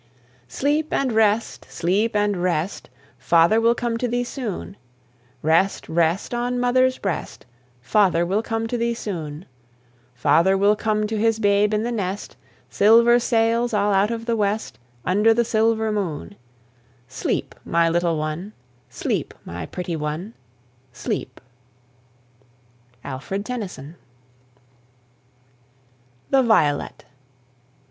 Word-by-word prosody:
Sleep 295 Hz, -, -1 dB
and 270 Hz, -2 st, 0 dB
rest, 220 Hz, 0 st, +1 dB
sleep 205 Hz, +6 st, 0 dB
and 205 Hz, -1 st, +2 dB
rest, 175 Hz, 0 st, -2 dB, 0.3 s
Father 170 Hz, +7 st, +4 dB
will 230 Hz, +1 st, +3 dB
come 235 Hz, -2 st, -2 dB
to 245 Hz, -, 0 dB
thee 245 Hz, +1 st, -1 dB
soon; 235 Hz, -6 st, -5 dB, 0.7 s
Rest, 165 Hz, +5 st, +2 dB
rest, 170 Hz, +6 st, 0 dB
on 245 Hz, +1 st, -1 dB
mother's 255 Hz, +1 st, +2 dB
breast, 195 Hz, -3 st, -4 dB, 0.4 s
Father 175 Hz, -, +3 dB
will 195 Hz, +5 st, 0 dB
come 225 Hz, 0 st, -3 dB
to 240 Hz, +1 st, -3 dB
thee 235 Hz, 0 st, 0 dB
soon; 165 Hz, -7 st, -6 dB, 0.7 s
Father 165 Hz, +9 st, +3 dB
will 200 Hz, +2 st, +4 dB
come 215 Hz, 0 st, 0 dB
to 215 Hz, 0 st, -2 dB
his 225 Hz, 0 st, +2 dB
babe 205 Hz, -1 st, +2 dB
in 215 Hz, 0 st, 0 dB
the 240 Hz, -, -2 dB
nest, 200 Hz, -3 st, -4 dB, 0.3 s
Silver 235 Hz, +3 st, +5 dB
sails 230 Hz, 0 st, +1 dB
all 205 Hz, 0 st, +2 dB
out 195 Hz, +2 st, +3 dB
of 230 Hz, -1 st, -4 dB
the 235 Hz, -1 st, 0 dB
west 205 Hz, -, -2 dB, 0.3 s
Under 210 Hz, +5 st, +3 dB
the 235 Hz, 0 st, +2 dB
silver 220 Hz, 0 st, +1 dB
moon: 200 Hz, -2 st, -4 dB, 0.7 s
Sleep, -, -, -3 dB
my 170 Hz, 0 st, +2 dB
little 170 Hz, 0 st, +1 dB
one, 155 Hz, +7 st, -4 dB, 0.4 s
sleep, -, -, -3 dB
my 85 Hz, -1 st, -6 dB
pretty 180 Hz, -2 st, -4 dB
one, 155 Hz, +7 st, -4 dB, 0.6 s
sleep. 125 Hz, -, -5 dB, 1.7 s
ALFRED 170 Hz, +10 st, -5 dB
TENNYSON. 185 Hz, -, -6 dB, 2.4 s
THE 270 Hz, -1 st, +5 dB
VIOLET. 155 Hz, -, +1 dB
210 Hz, 120 wpm, -22 LUFS, 175-230 Hz, 2.4 s, Silver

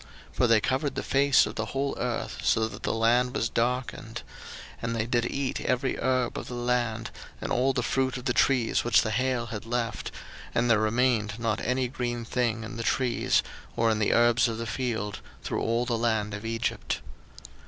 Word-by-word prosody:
02:010:015 -, -, -22 dB
For 125 Hz, -, +4 dB
they 115 Hz, -1 st, +5 dB
covered 135 Hz, +4 st, -1 dB
the -, -, -2 dB
face 140 Hz, 0 st, +4 dB
of -, -, -5 dB
the -, -, -2 dB
whole 135 Hz, +1 st, -2 dB
earth, 125 Hz, -1 st, -3 dB
so 110 Hz, 0 st, +2 dB
that -, -, -9 dB
the -, -, -1 dB
land 120 Hz, +3 st, +2 dB
was 115 Hz, -, 0 dB
darkened; 120 Hz, 0 st, -2 dB, 0.6 s
and 115 Hz, 0 st, -2 dB
they 110 Hz, -1 st, 0 dB
did 120 Hz, 0 st, 0 dB
eat 140 Hz, -1 st, -2 dB
every 130 Hz, +1 st, 0 dB
herb 130 Hz, -2 st, 0 dB
of -, -, -8 dB
the 125 Hz, -, -6 dB
land, 120 Hz, -2 st, -1 dB, 0.3 s
and -, -, -4 dB
all 130 Hz, +2 st, +3 dB
the 125 Hz, -2 st, -1 dB
fruit 130 Hz, +2 st, 0 dB
of 125 Hz, -, -8 dB
the 125 Hz, -, +2 dB
trees 125 Hz, -3 st, +2 dB
which 105 Hz, -6 st, +4 dB
the 110 Hz, -, -2 dB
hail 125 Hz, +1 st, 0 dB
had 105 Hz, -, -4 dB
left: 115 Hz, -1 st, -2 dB, 0.5 s
and 120 Hz, 0 st, +3 dB
there 110 Hz, -, +5 dB
remained 110 Hz, -1 st, +1 dB
not 115 Hz, -2 st, -1 dB
any 125 Hz, +1 st, 0 dB
green 120 Hz, -1 st, -3 dB
thing 115 Hz, -1 st, 0 dB
in 115 Hz, +1 st, -7 dB
the -, -, -3 dB
trees, 125 Hz, +1 st, +1 dB, 0.3 s
or 115 Hz, 0 st, +3 dB
in 110 Hz, -, 0 dB
the 105 Hz, -, +2 dB
herbs 120 Hz, +1 st, +4 dB
of 115 Hz, -1 st, -3 dB
the 115 Hz, -, -3 dB
field, 115 Hz, -4 st, -2 dB, 0.2 s
through -, -, -2 dB
all 115 Hz, +2 st, +1 dB
the 120 Hz, -1 st, 0 dB
land 110 Hz, -3 st, 0 dB
of 105 Hz, +1 st, -5 dB
Egypt. 115 Hz, 0 st, -2 dB
120 Hz, 205 wpm, -27 LUFS, 115-125 Hz, 0.6 s, they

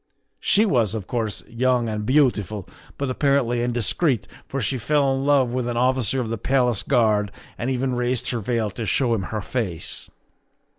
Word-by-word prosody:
She 210 Hz, +3 st, +3 dB
was, 115 Hz, -, +2 dB
of 105 Hz, -4 st, -4 dB
course, 110 Hz, -3 st, -2 dB
young 120 Hz, 0 st, +1 dB
and 105 Hz, -1 st, -3 dB
beautiful, 110 Hz, -, +2 dB, 0.3 s
but 140 Hz, -2 st, -2 dB
apparently 130 Hz, -3 st, +1 dB
indiscreet, 120 Hz, -, 0 dB, 0.2 s
for 140 Hz, -, -3 dB
she 125 Hz, +2 st, -1 dB
fell 140 Hz, +2 st, +2 dB
in 135 Hz, +1 st, -2 dB
love 140 Hz, -4 st, +4 dB
with 125 Hz, -1 st, -1 dB
an 120 Hz, -1 st, -2 dB
officer 130 Hz, 0 st, +2 dB
of 120 Hz, -3 st, -2 dB
the 115 Hz, -, -3 dB
Palace 125 Hz, -5 st, +2 dB
Guard 105 Hz, -4 st, +2 dB, 0.2 s
and 120 Hz, -, -3 dB
even 130 Hz, 0 st, 0 dB
raised 125 Hz, 0 st, -1 dB
her 120 Hz, -, -1 dB
veil 110 Hz, -1 st, -1 dB
to 110 Hz, +3 st, -5 dB
show 125 Hz, -4 st, +2 dB
him 100 Hz, -5 st, -1 dB
her 110 Hz, -1 st, -3 dB
face. 100 Hz, -8 st, -3 dB
120 Hz, 180 wpm, -23 LUFS, 110-130 Hz, 0.3 s, love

